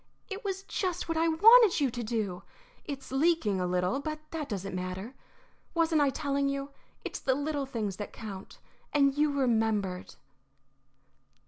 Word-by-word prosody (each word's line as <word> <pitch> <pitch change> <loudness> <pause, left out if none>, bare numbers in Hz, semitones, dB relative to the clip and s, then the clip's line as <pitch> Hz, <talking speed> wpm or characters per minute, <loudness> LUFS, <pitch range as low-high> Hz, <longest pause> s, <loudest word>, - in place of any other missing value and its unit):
"It 395 +3 -5
was 390 -1 -3
just 365 -3 -2
what 330 - -1
I 325 +1 +2
wanted 430 +5 +7
you 275 -4 +2
to 240 - -4
do. 215 -5 -2 0.4
It's 275 -3 -7
leaking 270 - +2
a 180 - 0
little, 180 +8 0
but 310 +1 -4
that 315 -3 -4
doesn't 195 -2 -4
matter. 185 +6 -4 0.6
Wasn't 325 -2 +3
I 285 - +4
telling 280 0 0
you? 275 0 -3 0.3
It's - - -4
the 260 -2 +1
little 290 -1 -2
things 215 -7 -3
that 205 - -6
count. 200 -4 -9 0.4
And 275 -1 +4
you 300 0 +2
remembered." 220 -8 0
275 Hz, 155 wpm, -30 LUFS, 210-315 Hz, 0.6 s, wanted